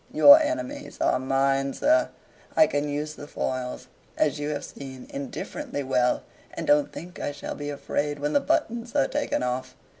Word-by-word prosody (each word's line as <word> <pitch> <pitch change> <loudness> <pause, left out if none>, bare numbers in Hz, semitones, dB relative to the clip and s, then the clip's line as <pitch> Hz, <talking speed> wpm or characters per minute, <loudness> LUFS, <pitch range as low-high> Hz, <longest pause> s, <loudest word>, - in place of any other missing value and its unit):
Your 285 +2 +9
enemies 295 -2 -3
are - - +2
mine, 135 +1 +1
sir; 315 +2 +3 0.5
I 315 - +8
can 145 - -1
use 150 +1 -3
the 145 - -10
foils, 130 -3 -3 0.3
as 150 -1 +1
you 145 0 -2
have 145 -1 -3
seen, 130 -2 -9
indifferently 140 +1 -5
well, 125 -2 +1 0.3
and - - -4
don't 145 0 +3
think 175 +1 -9
I - - -2
shall 145 - -6
be 145 0 -5
afraid 145 +1 -2
when 145 +1 -2
the - - +5
buttons 245 -6 -1
are 135 - +4
taken - - -1
off 125 +1 -2
'em." - - -31
145 Hz, 180 wpm, -26 LUFS, -, 0.5 s, Your